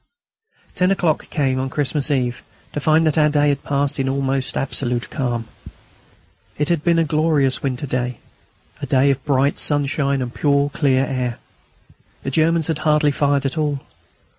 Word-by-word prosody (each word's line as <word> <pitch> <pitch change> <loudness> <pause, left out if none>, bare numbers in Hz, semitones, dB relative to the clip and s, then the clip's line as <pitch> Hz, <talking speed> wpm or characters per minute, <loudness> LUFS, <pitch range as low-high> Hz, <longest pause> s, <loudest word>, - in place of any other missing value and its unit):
Ten 180 0 +2
o'clock 175 -5 0
came 135 -3 0
on 130 0 -2
Christmas 145 +1 0
Eve 125 -4 -1 0.3
to - - -2
find 155 +3 +3
that 155 0 +2
our 150 0 +4
day 145 0 +2
had 140 -1 -1
passed 140 0 -1
in 135 0 0
almost 135 -1 -1
absolute 125 -2 -2
calm. 120 -5 -2 1.1
It 150 +2 0
had 170 -3 +1
been 170 -1 +3
a 165 - +4
glorious 155 -3 +1
winter 135 +1 -2
day, 125 -2 -2 0.6
a - - -4
day 135 +1 +3
of 135 -1 -3
bright 140 -1 +1
sunshine 140 -1 0
and 120 -1 -6
pure 140 -1 +1
clear 135 -3 +2
air. 125 -3 -2 0.9
The 135 - -3
Germans 160 +2 +2
had 160 -1 -1
hardly 150 -1 +3
fired 140 -1 +1
at 135 +4 -1
all. 145 -3 -1
140 Hz, 165 wpm, -20 LUFS, 130-150 Hz, 1.1 s, our